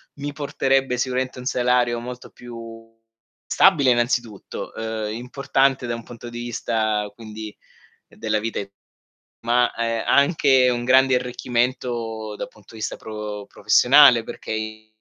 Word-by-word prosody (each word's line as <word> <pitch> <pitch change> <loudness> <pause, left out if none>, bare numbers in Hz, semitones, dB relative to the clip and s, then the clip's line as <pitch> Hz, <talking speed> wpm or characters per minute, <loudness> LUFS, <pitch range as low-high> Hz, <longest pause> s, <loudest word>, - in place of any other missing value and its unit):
mi 145 0 -5
porterebbe 135 -3 0
sicuramente 130 0 -2
un 125 - -9
salario 125 -1 +1
molto 125 +1 -8
più 115 -1 -11 0.5
stabile 150 -9 +4
innanzitutto, 120 -3 -2
uhm, 110 -1 -3
importante 135 +2 0
da 120 - -2
un 115 -1 -6
punto 120 0 -10
di 120 - -7
vista, 110 -3 -1
quindi, 110 -1 -9 0.5
della 110 -1 -2
vita 110 +2 -3
e 100 -1 -5 0.7
ma, 120 +1 +2
ehm, 115 -1 -1
anche 140 -3 +4
un 120 -1 -1
grande 130 +1 +5
arricchimento 120 -3 -2
da - - -4
punto 105 +1 -19
di 110 - -10
vista - - -3
pro 105 -2 -6
professionale, 120 +4 +6
perché - - -8
i 110 0 -5
120 Hz, 135 wpm, -22 LUFS, 110-125 Hz, 0.7 s, professionale